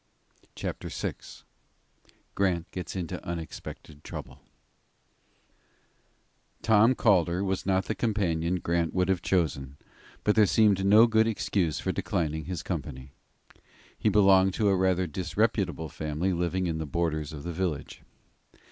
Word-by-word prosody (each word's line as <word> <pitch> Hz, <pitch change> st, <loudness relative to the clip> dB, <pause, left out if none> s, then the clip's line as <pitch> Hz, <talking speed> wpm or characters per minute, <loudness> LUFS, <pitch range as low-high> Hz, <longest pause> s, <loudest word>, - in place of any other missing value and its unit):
CHAPTER -, -, -5 dB
VI -, -, -3 dB, 1.2 s
GRANT 90 Hz, -4 st, 0 dB
GETS 90 Hz, -1 st, -6 dB
INTO 90 Hz, -4 st, -4 dB
UNEXPECTED 80 Hz, -3 st, -7 dB
TROUBLE -, -, -8 dB, 2.2 s
TOM 115 Hz, +3 st, +5 dB
CALDER 90 Hz, -5 st, +2 dB
was 95 Hz, -1 st, -2 dB
not 95 Hz, -1 st, +2 dB
the -, -, -1 dB
companion 90 Hz, -7 st, 0 dB
Grant 85 Hz, -1 st, -1 dB
would 90 Hz, 0 st, +1 dB
have 95 Hz, -3 st, +1 dB
chosen, 70 Hz, -7 st, -1 dB, 0.5 s
but 105 Hz, -, +3 dB
there 105 Hz, -2 st, +5 dB
seemed 100 Hz, -2 st, +3 dB
no 105 Hz, +4 st, +7 dB
good 110 Hz, -1 st, +3 dB
excuse 95 Hz, -7 st, -1 dB
for -, -, -1 dB
declining 80 Hz, -1 st, -2 dB
his 90 Hz, -3 st, -4 dB
company. 65 Hz, +1 st, -5 dB, 0.8 s
He -, -, +1 dB
belonged 95 Hz, -2 st, +5 dB
to 105 Hz, -3 st, +2 dB
a 95 Hz, -, +3 dB
rather 95 Hz, 0 st, +2 dB
disreputable 90 Hz, 0 st, -1 dB
family 80 Hz, +6 st, -2 dB
living 90 Hz, +2 st, -1 dB
in 80 Hz, -2 st, -2 dB
the 80 Hz, -, -4 dB
borders 80 Hz, -1 st, -1 dB
of 75 Hz, -2 st, -8 dB
the 85 Hz, 0 st, -4 dB
village. 85 Hz, -5 st, -3 dB
90 Hz, 130 wpm, -28 LUFS, 80-100 Hz, 2.2 s, no